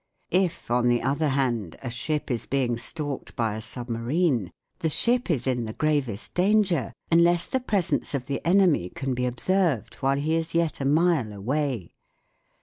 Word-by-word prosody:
If, 180 Hz, -9 st, 0 dB
on 120 Hz, 0 st, +3 dB
the 120 Hz, -1 st, +2 dB
other 145 Hz, +5 st, +1 dB
hand, 125 Hz, -, 0 dB
a 125 Hz, -, -4 dB
ship 150 Hz, +4 st, -2 dB
is 120 Hz, -, -3 dB
being 130 Hz, -3 st, +1 dB
stalked 145 Hz, +4 st, -5 dB
by 115 Hz, -3 st, 0 dB
a 110 Hz, -, -5 dB
submarine, 120 Hz, -, 0 dB, 0.3 s
the 160 Hz, -, 0 dB
ship 240 Hz, +8 st, +1 dB
is 135 Hz, -8 st, 0 dB
in 125 Hz, -3 st, 0 dB
the 110 Hz, -, -5 dB
gravest 140 Hz, -9 st, -1 dB
danger 190 Hz, -4 st, +2 dB, 0.2 s
unless 170 Hz, +1 st, +4 dB
the 260 Hz, -, -1 dB
presence 200 Hz, -, 0 dB
of 130 Hz, -2 st, -3 dB
the 140 Hz, +1 st, -3 dB
enemy 175 Hz, -, +3 dB
can 135 Hz, +5 st, -3 dB
be 125 Hz, 0 st, -1 dB
observed 155 Hz, -, 0 dB
while 135 Hz, 0 st, +2 dB
he 150 Hz, +3 st, 0 dB
is 165 Hz, 0 st, -2 dB
yet 165 Hz, -4 st, +1 dB
a -, -, -1 dB
mile 155 Hz, -5 st, +2 dB
away. 120 Hz, -, -2 dB
140 Hz, 170 wpm, -26 LUFS, 120-165 Hz, 0.3 s, unless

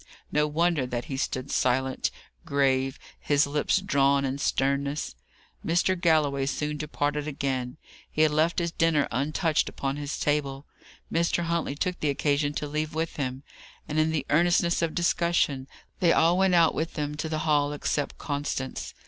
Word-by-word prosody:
No 150 Hz, 0 st, +2 dB
wonder 155 Hz, -3 st, +1 dB
that 120 Hz, -1 st, -3 dB
he 145 Hz, -4 st, -5 dB
stood 130 Hz, 0 st, -3 dB
silent, 130 Hz, +1 st, +1 dB, 0.3 s
grave, 135 Hz, -4 st, +1 dB, 0.2 s
his 145 Hz, +1 st, +2 dB
lips 145 Hz, +6 st, +1 dB
drawn 140 Hz, -6 st, +2 dB
in 135 Hz, +1 st, -2 dB
to 140 Hz, -, -5 dB
sternness. 140 Hz, +2 st, 0 dB, 0.5 s
Mr. 175 Hz, +3 st, +2 dB
Galloway 155 Hz, -6 st, +2 dB
soon 150 Hz, +2 st, -2 dB
departed 150 Hz, 0 st, -2 dB
again. 135 Hz, -2 st, -3 dB, 0.3 s
He 155 Hz, -, +2 dB
had 155 Hz, -, +4 dB
left 155 Hz, +3 st, +2 dB
his 170 Hz, -1 st, 0 dB
dinner 165 Hz, -4 st, +2 dB
untouched 150 Hz, +5 st, 0 dB
upon 135 Hz, 0 st, -3 dB
his 145 Hz, 0 st, -4 dB
table. 145 Hz, -2 st, -1 dB, 0.5 s
Mr. 170 Hz, +1 st, +1 dB
Huntley 170 Hz, -4 st, -1 dB
took 180 Hz, +4 st, -2 dB
the 150 Hz, -, 0 dB
occasion 145 Hz, +1 st, +1 dB
to 150 Hz, -, -3 dB
leave 155 Hz, +1 st, -3 dB
with 165 Hz, +1 st, -2 dB
him; 130 Hz, -1 st, -3 dB, 0.4 s
and, 150 Hz, -, -1 dB
in 155 Hz, +1 st, +3 dB
the 155 Hz, -4 st, -1 dB
earnestness 170 Hz, +2 st, +3 dB
of 165 Hz, -1 st, -1 dB
discussion, 170 Hz, -6 st, +1 dB, 0.3 s
they 170 Hz, -2 st, +4 dB
all 165 Hz, +2 st, +4 dB
went 190 Hz, -1 st, +3 dB
out 165 Hz, -2 st, +5 dB
with 165 Hz, +1 st, -3 dB
them 150 Hz, -1 st, -2 dB
to 160 Hz, -, -3 dB
the 155 Hz, -1 st, -1 dB
hall, 145 Hz, -2 st, +2 dB
except 145 Hz, 0 st, -2 dB
Constance. 145 Hz, -3 st, -4 dB
150 Hz, 165 wpm, -27 LUFS, 140-165 Hz, 0.5 s, out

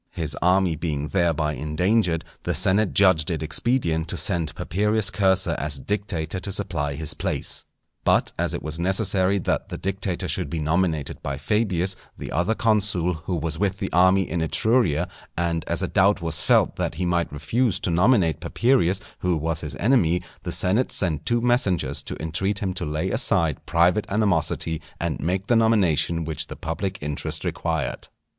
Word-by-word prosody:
His 80 Hz, -3 st, -2 dB
army 90 Hz, -1 st, +3 dB
being 75 Hz, -2 st, -3 dB
thereby 80 Hz, -5 st, +1 dB
endangered, 85 Hz, +4 st, 0 dB, 0.2 s
the -, -, -2 dB
senate 100 Hz, +2 st, +2 dB
judged 95 Hz, -4 st, +4 dB
it 80 Hz, -2 st, -2 dB
expedient 85 Hz, -2 st, 0 dB
to -, -, -2 dB
send 80 Hz, -3 st, 0 dB
Papirius 105 Hz, +5 st, +1 dB
Cursor 95 Hz, -1 st, +2 dB
as 70 Hz, 0 st, -1 dB
dictator 95 Hz, 0 st, -3 dB
to 100 Hz, -, -6 dB
supply 75 Hz, -7 st, -1 dB
his 80 Hz, 0 st, 0 dB
place. -, -, 0 dB, 0.4 s
But -, -, +2 dB
as -, -, -1 dB
it -, -, -6 dB
was 80 Hz, +2 st, -4 dB
necessary 95 Hz, +1 st, +2 dB
that 95 Hz, -, -2 dB
the -, -, -5 dB
dictator 95 Hz, -2 st, -3 dB
should -, -, -2 dB
be 85 Hz, -, -3 dB
nominated 80 Hz, -1 st, -1 dB
by 70 Hz, -1 st, -4 dB
Fabius, 95 Hz, +1 st, 0 dB, 0.2 s
the -, -, -7 dB
other 95 Hz, +6 st, 0 dB
consul, 100 Hz, -6 st, +1 dB
who 80 Hz, +3 st, -4 dB
was 80 Hz, -1 st, -3 dB
with 100 Hz, -2 st, 0 dB
the -, -, -4 dB
army 95 Hz, +2 st, +4 dB
in 85 Hz, +1 st, -2 dB
Etruria, 90 Hz, -, +1 dB, 0.3 s
and 85 Hz, -2 st, -1 dB
as -, -, -1 dB
a -, -, 0 dB
doubt 100 Hz, +2 st, +3 dB
was 85 Hz, -2 st, -1 dB
felt -, -, +2 dB
that -, -, -2 dB
he 90 Hz, +3 st, -2 dB
might 85 Hz, -1 st, 0 dB
refuse 95 Hz, -, 0 dB
to 90 Hz, -, -1 dB
nominate 90 Hz, -, +3 dB
Papirius, 115 Hz, -7 st, +1 dB, 0.2 s
who 90 Hz, -2 st, 0 dB
was 80 Hz, +1 st, -2 dB
his 75 Hz, -, -5 dB
enemy, 90 Hz, -8 st, +2 dB, 0.2 s
the -, -, -5 dB
senate 105 Hz, +8 st, +1 dB
sent 80 Hz, -5 st, +1 dB
two 120 Hz, 0 st, +2 dB
messengers 95 Hz, -, +1 dB
to -, -, -7 dB
entreat 95 Hz, +6 st, -2 dB
him 100 Hz, -3 st, -2 dB
to 90 Hz, -3 st, -4 dB
lay 80 Hz, +5 st, -2 dB
aside 95 Hz, -, +2 dB
private 90 Hz, +5 st, +2 dB
animosity, 85 Hz, -5 st, 0 dB, 0.2 s
and 85 Hz, -6 st, -2 dB
make 90 Hz, +5 st, -1 dB
the 120 Hz, -, +2 dB
nomination 95 Hz, -7 st, +2 dB
which 80 Hz, -1 st, -4 dB
the -, -, -8 dB
public 95 Hz, +4 st, -4 dB
interest 75 Hz, -1 st, -3 dB
required. -, -, -3 dB
90 Hz, 175 wpm, -24 LUFS, 80-100 Hz, 0.4 s, judged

